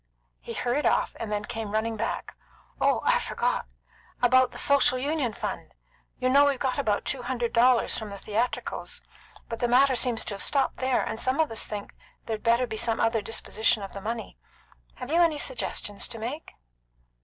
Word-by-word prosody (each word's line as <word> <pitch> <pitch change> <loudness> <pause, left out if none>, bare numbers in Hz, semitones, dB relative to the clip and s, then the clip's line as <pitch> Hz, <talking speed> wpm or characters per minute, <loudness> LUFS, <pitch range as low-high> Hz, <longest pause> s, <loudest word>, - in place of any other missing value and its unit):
He - - -7
hurried 250 +5 0
off, - - +1
and 220 -2 -4
then 210 0 -2
came 225 -2 -5
running 225 +1 0
back. 215 - -4 0.5
"Oh, - - +3
I - - +4
forgot! - - -1 0.5
About 255 +1 +5
the - - -11
Social 280 -2 +4
Union 280 -2 -1
fund. - - -5 0.4
You 255 - 0
know 280 +3 +6
we've 280 -2 +2
got 260 +1 -1
about 210 -7 0
two 265 - +1
hundred 245 -1 -2
dollars 245 0 +4
from 220 -2 -7
the 200 - -7
theatricals, 220 +5 -3 0.4
but 230 - -5
the 240 - +1
matter 260 +2 +4
seems 245 -2 +1
to - - -4
have 200 - -5
stopped 275 -2 +1
there, 260 -1 +1
and 220 - -4
some 260 +4 0
of 315 -5 +2
us 225 - 0
think 205 -1 -6 0.3
there'd 220 -2 -3
better 235 +2 +3
be 220 -2 -5
some 225 +1 +1
other 225 -1 +2
disposition 220 0 0
of 195 - -8
the 200 - -7
money. 225 +2 -5 0.6
Have 250 +3 -7
you 340 +2 +4
any 330 -3 +3
suggestion 250 - -2
to 230 - -2
make?" 250 +8 -6
240 Hz, 190 wpm, -27 LUFS, 220-260 Hz, 0.6 s, know